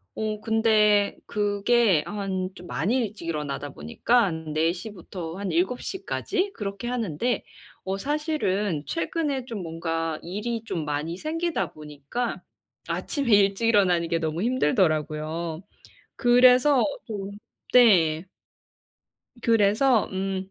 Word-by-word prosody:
어 215 -1 -3
근데 215 -2 +3
그게 205 -3 +2
한 190 -2 -3
좀 175 - -11
많이 170 - 0
일찍 210 -7 -3
일어나다 145 -2 -3
보니깐 160 - 0
4 160 +2 +2
시부터 180 -4 -7
한 200 -3 -3
7 185 +9 0
시까지 390 0 -2
그렇게 200 +2 -5
하는데 235 -1 -1 0.4
어 190 +1 -2
사실은 210 - -1
최근에 265 - -2
좀 225 -6 -5
뭔가 165 -1 -3
일이 215 +6 -4
좀 165 -7 -3
많이 150 +3 -2
생기다 315 - -2
보니까 150 - -5 0.5
아침에 275 -7 -2
일찍 200 +3 +3
일어나는 180 -6 +3
게 165 - 0
너무 160 +2 -2
힘들더라고요. 165 - 0 0.5
그래서 250 +2 +5 0.2
좀 200 -4 -5 0.4
네. 180 -8 +5 1.2
그래서 225 +2 +3
음 190 0 -3
200 Hz, 230 characters per minute, -25 LUFS, 165-235 Hz, 1.2 s, 그래서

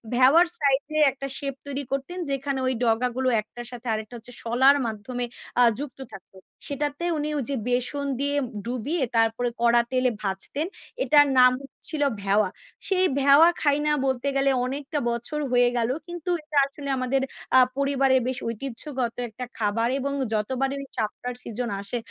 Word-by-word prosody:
ভেওয়ার 270 +8 +6
side 280 -3 +2 0.2
এ - - +3
একটা 275 +1 -6
shape 275 -2 -4
তৈরি 280 0 -3
করতেন 275 +6 -3
যেখানে 275 0 -2
ওই 255 - +1
ডগা 230 +1 +2
গুলো 260 0 0
১ 215 - -22
টার 240 -1 -7
সাথে 245 0 -9
আরেকটা 215 +2 -5
হচ্ছে 235 +2 -9
শলার 260 +4 +5
মাধ্যমে 245 +3 -4 0.3
আ - - +7 0.2
যুক্ত 280 -2 -7
থাকত। 190 - -12 0.4
সেটাতে 290 +3 -3
উনি 300 0 -2
ওই 275 - -1
যে 275 - -1
বেসন 250 +3 -1
দিয়ে 285 +1 0 0.3
ডুবিয়ে 255 +6 -2
তারপরে 225 +2 +2
কড়া 235 0 +5
তেলে 255 0 +2
ভাজতেন। 200 - -1 0.4
এটার 290 -1 +6
নাম 250 0 +8
হচ্ছিল 290 +3 -5 0.2
ভেওয়া। 200 0 +2 0.4
সেই 375 -1 +3
ভেওয়া 280 +5 +7
খাই 290 -2 +3
না 300 - +3
বলতে 265 0 -1
গেলে 275 0 +3 0.2
অনেকটা 285 +3 -3
বছর 235 +6 -2
হয়ে 245 -1 +4
গেল, 230 0 +1 0.2
কিন্তু 345 0 -6
এটা 300 -1 -4
আসলে 280 0 -8
আমাদের 255 +1 0 0.4
আ - - +9 0.2
পরিবারের 275 -2 +3
বেশ 255 -1 -2
ঐতিহ্যগত 255 +1 -4 0.2
একটা 245 +4 -7
খাবার 225 +2 0
এবং 280 +1 -2 0.2
যতবারই 265 +6 -1
চাপটার 230 +3 -3
সিজন 235 +1 -4
আসে, 200 +5 -4
260 Hz, 165 wpm, -25 LUFS, 240-280 Hz, 0.4 s, আ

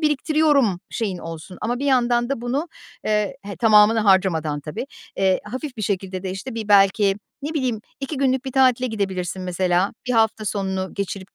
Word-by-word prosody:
biriktiriyorum 295 - +2
şeyin 200 -6 -2
olsun 165 +2 -8
ama 240 +3 -1
bir 280 - -2
yandan 240 -2 +2
da 275 -4 -2
bunu, 275 +8 -2 0.4
eee, 210 -2 0
he, 200 -3 -7
tamamına 215 +2 +5
harcamadan 165 -7 +2
tabii, 150 - -6 0.3
eee, 190 -1 +2
hafif 255 +5 -6
bir 215 - -5
şekilde 190 -2 -2
de 190 - -3
işte 195 +7 -6
bir 220 -2 -5
belki 195 0 +4 0.3
ne 305 +3 -4
bileyim 255 -7 -1 0.2
2 275 +2 -4
günlük 265 -1 +1
bir 265 - -5
tatile 255 -2 +3
gidebilirsin 190 -5 -3
mesela 180 +1 +1
bir 250 - 0
hafta 220 -1 +2
sonunu 190 -2 -2
geçirip 200 -1 -5
210 Hz, 175 wpm, -22 LUFS, 190-255 Hz, 0.4 s, tamamına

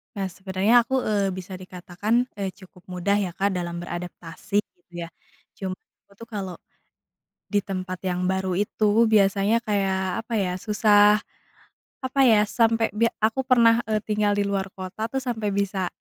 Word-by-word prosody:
Nah, 195 -2 -2
sebenernya 195 +6 +2
aku, 265 +1 0
eee, 200 -4 0
bisa 185 0 -7
dikatakan, 185 +6 -2
eee, 195 -2 -3
cukup 185 -2 -17
mudah 185 +2 0
ya, 190 -4 -1
Kak, 200 +3 +1
dalam 175 -2 -3
beradaptasi 175 +3 -3
gitu 175 -3 -43
ya, 170 - -6 0.5
cuma 190 -2 -3 0.3
aku 200 - -23
tuh 230 - -9
kalau, 195 -5 -5 1.0
di 205 - +4
tempat 185 -2 -5
yang 180 0 -1
baru 190 -1 -1
itu 210 +2 +2
biasanya 200 +2 +3
kayak 195 -1 -1
apa 235 - -10
ya 180 -2 -1
susah 210 0 +4 0.8
apa 260 +1 -4
ya 210 -2 +5
sampai 225 0 +1
be 230 +2 +3 0.2
aku 225 +4 +2
pernah, 235 -2 +5
eee, 215 -1 0
tinggal 210 -1 +1
di 205 - +2
luar 195 -1 -1
kota 190 +4 -5
tuh 270 - -4
sampai 225 -5 -2
bisa 195 -2 -1
200 Hz, 160 wpm, -24 LUFS, 185-215 Hz, 1.0 s, ya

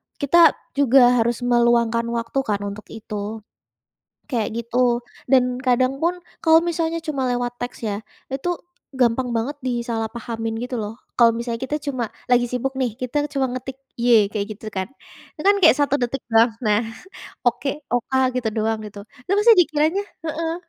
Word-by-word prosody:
kita 330 +4 +5 0.2
juga 250 -2 +5
harus 235 +1 0
meluangkan 235 -1 +2
waktu 235 +3 -2
kan 205 -1 -1
untuk 200 +1 -6
itu, 215 0 -6 0.9
kayak 225 -4 -1
gitu, 240 +1 +1 0.2
dan 250 -2 +3
kadang 255 +1 +1
pun 350 +3 -1 0.2
kalau 325 0 +5
misalnya 330 -1 -1
cuma 275 -5 -2
lewat 245 0 -3
teks 245 0 -6
ya, 210 -1 -3 0.2
itu 330 +7 -3 0.3
gampang 250 -1 +1
banget 235 +6 -1
disalahpahamin 225 -1 -3
gitu 250 0 -4
loh. 220 +2 -5 0.2
Kalau 235 -1 +6
misalnya 235 +1 -4
kita 295 +3 -2
cuma 255 -6 -3 0.2
lagi 245 -1 +4
sibuk 260 +2 -2
nih, 255 -4 0
kita 255 +4 -1
cuma 270 -2 0
ngetik, 255 +1 -6 0.2
"Y" 235 -4 +4
kayak 205 0 -3
gitu 220 - -10
kan, 190 +3 -3 0.5
itu - - -6
kan 405 - +6
kayak 320 - +8
1 285 -1 +2
detik 245 +3 -1
doang. 225 +1 +5
Nah, 215 -2 +2 0.7
oke, 270 +4 -1
O-K 245 +2 -2 0.2
gitu 240 -3 0
doang, 220 0 -1
gitu. 205 -1 -9 0.2
Itu 385 - -2
pasti 455 +2 +7
dikiranya 325 +3 +2 0.3
heeh. 325 +1 -2
245 Hz, 160 wpm, -22 LUFS, 230-275 Hz, 0.9 s, kayak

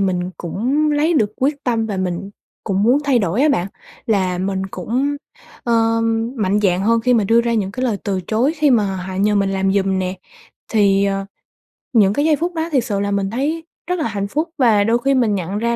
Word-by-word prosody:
mình 185 -2 -1
cũng 260 - -1
lấy 310 +4 +2
được 215 -8 +1
quyết 285 +2 -1
tâm 230 -3 0
và 205 - -3
mình 185 +1 -3 0.3
cũng 195 -1 0
muốn 245 +6 +4
thay 270 -4 +3
đổi 200 +6 0
á 305 - +4
bạn, 185 -10 +1 0.4
là 185 -5 +1
mình 190 +1 -2
cũng, 255 +10 -2 0.5
ơ, 230 -1 +2 0.4
mạnh 205 -1 +1
dạn 185 -2 +2
hơn 230 +3 +2
khi 250 +2 +2
mà 220 -4 +2
đưa 230 +3 +4
ra 235 0 -1
những 200 -3 -1
cái 255 +3 -3
lời 230 -5 0
từ 195 -2 -1
chối 240 +7 +1
khi 300 -1 +3
mà 205 -6 +2
họ 185 +1 -6
nhờ 205 +2 +1
mình 195 -1 +1
làm 195 0 0
giùm 195 -1 +1
nè, 185 0 -2 0.5
thì, 200 -2 +3
ờ, 195 0 -1 0.7
những 205 -4 +4
cái 290 +6 0
giây 315 -1 +4
phút 345 +4 -3
đó 325 0 -2
thiệt 265 -5 +2
sự 205 -4 -2
là 200 0 -1
mình 200 -1 0
thấy 300 +8 -2 0.2
rất 360 -1 -1
là 310 - 0
hạnh 200 -2 -3
phúc 310 +10 -2
và 225 -6 +4
đôi 230 +3 +2
khi 275 +2 +1
mình 235 -6 +2
nhận 190 +2 -3
ra 235 +2 0
215 Hz, 230 wpm, -19 LUFS, 195-255 Hz, 0.7 s, muốn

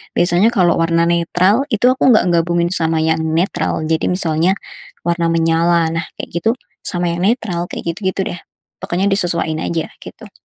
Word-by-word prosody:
Biasanya, 175 +4 +3
kalau 180 -5 +3
warna 165 0 +2
netral 180 +7 +2
itu 220 +3 +2
aku 260 0 +3
enggak 215 - +3
gabungin 170 0 +1
sama 165 -2 0
yang 160 0 +1
netral. 160 0 -1
Jadi, 160 0 0
misalnya 175 0 +1 0.5
warna 170 -1 0
menyala, 165 0 +2
nah, 165 0 -3
kayak - - -6
gitu 225 - +3 0.3
sama 175 -1 -1
yang 170 - -3
netral, 200 -6 -1
kayak - - -7
gitu-gitu, 190 0 -2
deh. - - -10 0.4
Pokoknya, 185 +3 -1
disesuain 170 -5 +1
aja, 165 -1 -3
gitu. - - -12
170 Hz, 160 wpm, -17 LUFS, 165-185 Hz, 0.5 s, Biasanya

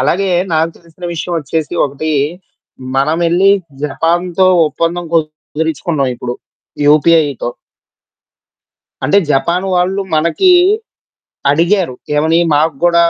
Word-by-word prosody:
అలాగే 185 +8 +1 0.2
నాకు 160 +1 +1
తెలిసిన 170 +1 -14
విషయం 170 +1 -4
ఒచ్చేసి 155 +3 -3
ఒకటి 140 +3 -4 0.9
మనమెళ్లి 170 +7 +2 0.3
జపాన్‌తో 175 +5 0 0.2
ఒప్పందం 165 +4 -2
కుదిరిచుకున్నాం 155 -2 -2
ఇప్పుడు. 120 0 -5 0.5
యూపీఐతో. 150 -3 +3 1.6
అంటే 150 +9 +4
జపాన్ 170 +7 0
వాళ్ళు 185 +2 0
మనకి 170 - +2 1.0
అడిగారు. 170 0 +1 0.2
ఏమని 160 +3 +2 0.2
మాకు 155 +1 +2
గూడ 175 -1 +3
165 Hz, 90 wpm, -14 LUFS, 150-175 Hz, 1.6 s, అంటే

